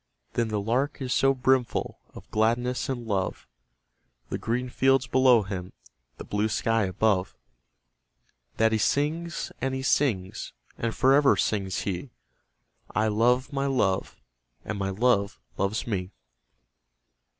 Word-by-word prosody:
But 115 -1 0
the 105 -1 -1
Lark 125 +8 -1
is 130 -2 -2
so 135 0 +3
brimful 130 -1 0 0.2
of - - -11
gladness 120 +4 0
and 120 -3 -3
love, 100 -4 -2 0.8
The - - -3
green 125 +3 -1
fields 135 +1 +2
below 125 -3 +4
him, 95 -2 -6 0.4
the - - -7
blue 105 +1 -1
sky 115 0 +1
above, 95 0 0 1.2
That 110 0 +3
he 110 - +1
sings, 160 +8 -1
and 130 0 -1
he 130 - -4
sings; 110 -10 0 0.2
and 115 -1 -3
for 130 +1 +4
ever 140 0 +5
sings 95 -3 -1
he 100 +7 -4 0.9
'I 110 +1 +2
love 125 +6 +2
my 135 0 0
Love, 100 -9 0 0.5
and 105 -1 -4
my 95 -1 -1
Love 100 - +1 0.2
loves 100 +3 -1
me!' 95 -5 -2
115 Hz, 135 wpm, -26 LUFS, 100-130 Hz, 1.2 s, ever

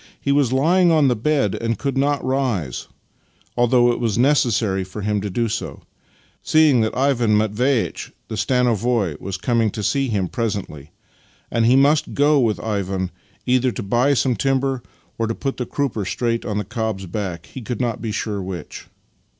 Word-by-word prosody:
He 140 - -1
was 140 -3 +2
lying 170 +7 +3
on 155 -4 +4
the 125 - +2
bed, 135 -2 +1
and 115 0 -2
could 140 -2 -2
not 140 0 +1
rise, 125 - -1 0.7
although 120 0 +4
it - - -2
was 115 -4 0
necessary 120 -7 +2
for 95 +3 -7
him 105 0 0
to 105 - -3
do 115 +5 0
so, 110 - -5 0.6
seeing 155 -6 +4
that 110 +2 -1
Ivan 125 -5 +2
Matveitch, 110 +4 0 0.2
the - - -7
stanovoi, 115 - +1
was 95 0 -4
coming 115 +2 +1
to 105 +1 -5
see 135 +5 +1
him 100 -6 -1
pre 115 +6 -2
sently, 90 -9 -5 0.6
and 115 -1 +2
he 125 - +5
must 145 +3 +3
go 145 +1 +4
with 110 -8 +1
Ivan 95 -3 -2 0.3
either 125 0 +2
to - - -5
buy 120 +8 +2
some 125 0 +1
timber 135 -1 0 0.4
or 115 - +1
to 115 - -2
put 135 -1 -3
the 125 - -3
crupper 135 -7 -2
straight 115 -1 -1
on 105 -3 -2
the 105 - -2
cob's 110 -3 -3
back 90 -2 -5
— - - -21
he 130 - -6
could 120 +1 -5
not 120 -3 -2
be 110 -2 -3
sure 105 -1 -3
which. 90 -4 -7
115 Hz, 185 wpm, -21 LUFS, 105-135 Hz, 0.7 s, he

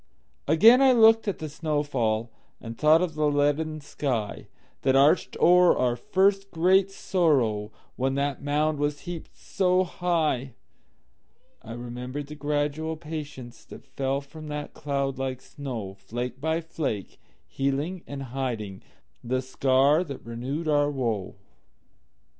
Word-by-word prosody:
Again 220 - +7
I 265 -1 +6
looked 225 -1 +5
at 200 - -1
the 155 - -5
snow 150 0 -1
fall, 115 -5 -1 0.3
And 115 -1 -8
thought 155 +5 +4
of 175 -3 -2
the 155 0 +1
leaden 145 +2 0
skyThat 130 0 -3
arched 140 +6 +3
o'er 180 0 +6
our 125 -1 +1
first 195 - +1
great 185 +3 +3
sorrow, 130 - +1 0.3
When 135 +1 0
that 140 0 -1
mound 150 +1 0
was 145 0 -1
heaped 175 -2 -8
so 185 -1 +1
high.I 155 -9 -5
remembered 125 +4 -6
the 150 +2 -9
gradual 150 +2 -2
patienceThat 150 -6 -9
fell 135 +1 -2
from 155 +2 -11
that 150 0 -5
cloud 140 -2 -2
like 130 -1 -3
snow, 120 -10 -6
Flake 120 +6 -6
by 160 +2 0
flake, 145 - -4 0.3
healing 140 +7 -2
and 140 -1 -6
hidingThe 120 - -5
scar 135 +4 +3
that 140 -6 -9
renewed 130 +8 -4
our 145 -1 +3
woe. 115 -9 -2
145 Hz, 125 wpm, -26 LUFS, 130-160 Hz, 0.3 s, Again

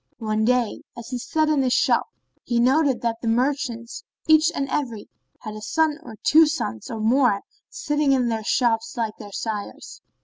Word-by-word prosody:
One 215 -1 -1
day, 250 -2 +1 0.2
as 235 0 -8
he 250 -2 -3
sat 310 +5 0
in 305 -2 +2
his 255 -2 +1
shop, - - +2 0.4
he 240 -1 0
noted 265 +2 +3
that 230 -1 -2
the 230 - -4
merchants, 240 -1 -1 0.2
each 315 +1 +5
and 275 - -1
every, 240 -7 -3 0.3
had 215 -2 -7
a 215 - -8
son 315 +5 0
or 230 -9 -10
two 320 +1 +6
sons 115 - -4
or 225 - -5
more 225 -2 +3 0.3
sitting 295 -1 0
in 255 -3 +2
their 225 -2 -2
shops 230 +1 0
like 220 -2 -2
their 205 -2 -10
sires. 210 -1 -6
240 Hz, 180 wpm, -23 LUFS, 225-285 Hz, 0.4 s, two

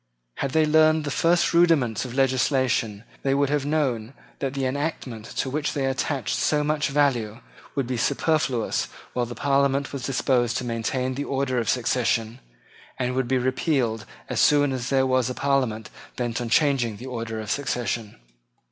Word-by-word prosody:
Had 135 -1 -2
they 160 -1 +4
learned 155 0 +4
the 145 - -3
first 170 +5 +2
rudiments 160 -10 +3
of 125 -1 -7
legislation, 130 -5 +1 0.2
they 135 0 +1
would 140 0 +1
have 145 -1 0
known 135 -5 -1 0.2
that 135 -1 -3
the 135 -1 -1
enactment 130 -5 -3
to - - 0
which 145 +3 -2
they 140 -2 -1
attached 135 0 -1
so 150 -1 +1
much 150 0 0
value 130 -7 +1 0.4
would 140 -3 0
be 125 0 -3
superfluous 135 -2 0 0.3
while 120 -1 -1
the 120 - -7
Parliament 140 0 +1
was 140 - -4
disposed 125 -2 +1
to - - -3
maintain 120 +2 -1
the 140 +3 -3
order 135 -2 0
of 115 - -2
succession, 115 -2 0 0.6
and 125 0 -1
would 130 -1 0
be 130 +1 +2
repealed 130 -3 0 0.2
as - - -2
soon 145 -1 +4
as 125 -1 -3
there 135 -1 +3
was 130 -1 +1
a 125 - -4
Parliament 130 -6 0 0.2
bent 120 -1 -2
on 120 - -3
changing 125 -5 +2
the 125 - -9
order 115 -3 -4
of 110 0 -4
succession. 120 -5 -2
130 Hz, 175 wpm, -24 LUFS, 120-140 Hz, 0.6 s, they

